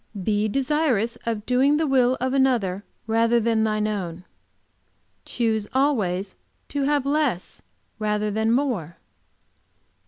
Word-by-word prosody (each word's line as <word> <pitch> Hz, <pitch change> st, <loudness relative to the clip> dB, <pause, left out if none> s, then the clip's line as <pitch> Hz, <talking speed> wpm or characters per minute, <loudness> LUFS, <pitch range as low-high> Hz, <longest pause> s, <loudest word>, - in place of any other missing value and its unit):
"Be 210 Hz, +2 st, +1 dB
desirous 260 Hz, -2 st, 0 dB
of 220 Hz, -2 st, -2 dB
doing 270 Hz, +4 st, +3 dB
the 320 Hz, -, +1 dB
will 260 Hz, -2 st, +3 dB
of 260 Hz, +1 st, -1 dB
another 235 Hz, -8 st, +1 dB, 0.2 s
rather 230 Hz, +1 st, +2 dB
than 225 Hz, -1 st, +1 dB
thine 215 Hz, -1 st, 0 dB
own." 180 Hz, -5 st, -4 dB, 1.0 s
"Choose 220 Hz, -3 st, -1 dB
always 205 Hz, -9 st, 0 dB, 0.3 s
to 285 Hz, -, -2 dB
have 290 Hz, -1 st, +1 dB
less, 280 Hz, -, -1 dB, 0.4 s
rather 210 Hz, 0 st, 0 dB
than 220 Hz, +2 st, +1 dB
more." 230 Hz, -, -1 dB
230 Hz, 120 wpm, -24 LUFS, 210-265 Hz, 1.0 s, doing